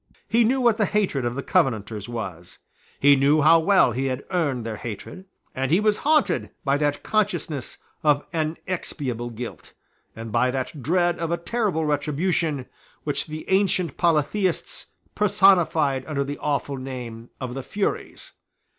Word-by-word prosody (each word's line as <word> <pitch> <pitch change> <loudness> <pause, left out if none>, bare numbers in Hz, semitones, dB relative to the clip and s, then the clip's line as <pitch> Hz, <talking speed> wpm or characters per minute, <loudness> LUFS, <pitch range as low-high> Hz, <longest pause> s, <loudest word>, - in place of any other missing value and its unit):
He 235 +1 +3
knew 255 +4 +2
what 235 -3 +3
the 210 - +3
hatred 190 - 0
of 120 0 -2
the 140 - -4
Covenanters 110 - 0
was: 95 -7 -6 0.4
he 140 0 +6
knew 140 +3 +3
how 165 +2 +7
well 185 -5 +4
he 130 +4 -1
had 130 +1 -3
earned 145 -10 0
their 110 -2 -4
hatred; 120 - -7 0.3
and 130 0 -1
he 170 +5 +4
was 210 0 +2
haunted 305 0 +2 0.2
by 140 0 +3
that 145 -1 -1
consciousness 175 - -1 0.3
of 145 -2 +3
inexpiable 155 -6 -3
guilt, 115 -8 -8 0.4
and 115 0 -7
by 120 +3 +2
that 130 +3 -4
dread 175 +5 +1
of 165 -1 -2
a 170 - 0
terrible 185 -3 -1
retribution, 150 0 0 0.4
which 145 +2 -1
the 155 0 -7
ancient 190 -5 +2
polytheists 170 +3 0 0.3
personified 185 -9 +3
under 145 -3 -1
the 140 +1 -5
awful 140 -1 -1
name 125 -3 -7
of 125 -2 -4
the 135 - -4
Furies. 200 +10 -3
150 Hz, 155 wpm, -24 LUFS, 130-180 Hz, 0.4 s, how